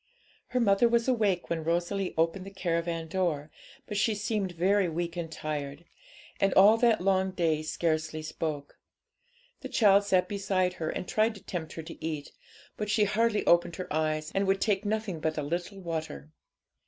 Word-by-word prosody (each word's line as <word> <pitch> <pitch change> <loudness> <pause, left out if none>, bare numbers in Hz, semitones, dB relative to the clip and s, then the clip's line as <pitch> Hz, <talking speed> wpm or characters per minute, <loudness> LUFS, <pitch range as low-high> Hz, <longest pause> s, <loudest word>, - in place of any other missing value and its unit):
Her 250 - -1
mother 225 +1 +4
was 235 +1 +2
awake 210 -10 +1
when 165 -1 -1
Rosalie 175 +4 -1
opened 165 +3 +1
the 195 - -8
caravan 170 -3 -2
door, 160 -4 -1 0.3
but 210 - -4
she 215 +1 +2
seemed 205 -3 -2
very 185 +2 +2
weak 170 +1 -3
and 165 -2 -4
tired, 150 0 -5 0.5
and 195 - +3
all 205 +3 +8
that 230 -4 +3
long 190 0 +2
day 165 -4 0
scarcely 155 0 -1
spoke. 155 -2 -5 0.8
The 260 - -7
child 205 -6 +5
sat 185 -2 +2
beside 190 -2 0
her, 160 - -1
and 180 - -4
tried 220 +1 +1
to 200 - -13
tempt 165 -4 -5
her 160 - -6
to 165 - -11
eat, 155 -3 -4 0.5
but 210 -1 -3
she 215 0 +3
hardly 210 +1 +1
opened 170 0 +3
her 185 - -6
eyes, 155 0 -1
and 195 0 +1
would 195 0 +2
take 205 -1 0
nothing 210 -5 -2
but 155 0 -2
a 150 - -1
little 175 +6 -4
water. 160 - -5
180 Hz, 180 wpm, -29 LUFS, 160-200 Hz, 0.8 s, all